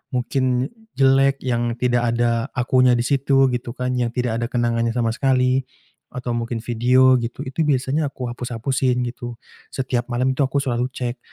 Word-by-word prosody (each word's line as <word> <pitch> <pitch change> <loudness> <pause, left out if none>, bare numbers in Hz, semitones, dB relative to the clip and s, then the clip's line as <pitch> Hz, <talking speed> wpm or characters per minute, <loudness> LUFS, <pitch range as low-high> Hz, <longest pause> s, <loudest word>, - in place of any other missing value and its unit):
mungkin 130 +1 0 0.2
jelek, 135 0 +3
yang 120 -2 -1
tidak 120 -1 +1
ada 120 +1 +1
akunya 125 0 +3
di 120 - 0
situ, 135 0 +2
gitu 120 0 -4
kan, 125 0 -2
yang 120 - +1
tidak 120 -2 -1
ada 115 - -1
kenangannya 115 -1 0
sama 115 -2 +1
sekali 130 +1 +1 0.4
atau 125 -1 -5
mungkin 115 -1 -3
video, 125 +2 +4
gitu. 120 0 -5
Itu 145 +4 -2
biasanya 140 +2 +1
aku 125 -3 -5
hapus-hapusin 125 +1 -1
gitu, 120 -1 -8 0.3
setiap 125 -2 -2
malam 125 +2 0
itu 135 +1 +1
aku 140 +1 -1
selalu 125 -1 -1
cek. 120 0 -4
125 Hz, 165 wpm, -21 LUFS, 120-130 Hz, 0.4 s, video